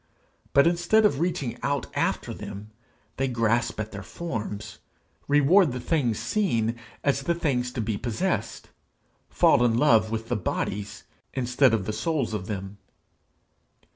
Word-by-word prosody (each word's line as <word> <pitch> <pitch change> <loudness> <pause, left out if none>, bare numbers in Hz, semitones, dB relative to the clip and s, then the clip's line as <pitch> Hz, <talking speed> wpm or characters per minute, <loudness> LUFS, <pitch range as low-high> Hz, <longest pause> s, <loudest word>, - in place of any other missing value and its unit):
But 140 - +6
instead 175 +6 +3
of 140 -10 +2
reaching 140 -8 -2
out 140 0 -1
after - - -1
them, 105 +2 -8 0.5
they 135 - +1
grasp 115 -2 0
at 110 0 -4
their 100 - -7
forms, 105 - -6 0.5
reward 145 +2 +5
the 125 - -4
things 125 -4 0
seen 120 - 0 0.3
as 140 -1 +1
the 170 +5 0
things 125 -7 -1
to 120 - -2
be 110 -1 -2
possessed, 120 - -2 0.6
fall - - +4
in 115 -2 +3
love 120 -6 +4
with 115 0 -3
the - - 0
bodies 100 +1 -3 0.3
instead 125 +1 +3
of 110 -4 0
the 110 - -2
souls 130 +1 -1
of 95 -3 -4
them. 100 -1 -6
120 Hz, 145 wpm, -26 LUFS, 110-145 Hz, 0.6 s, But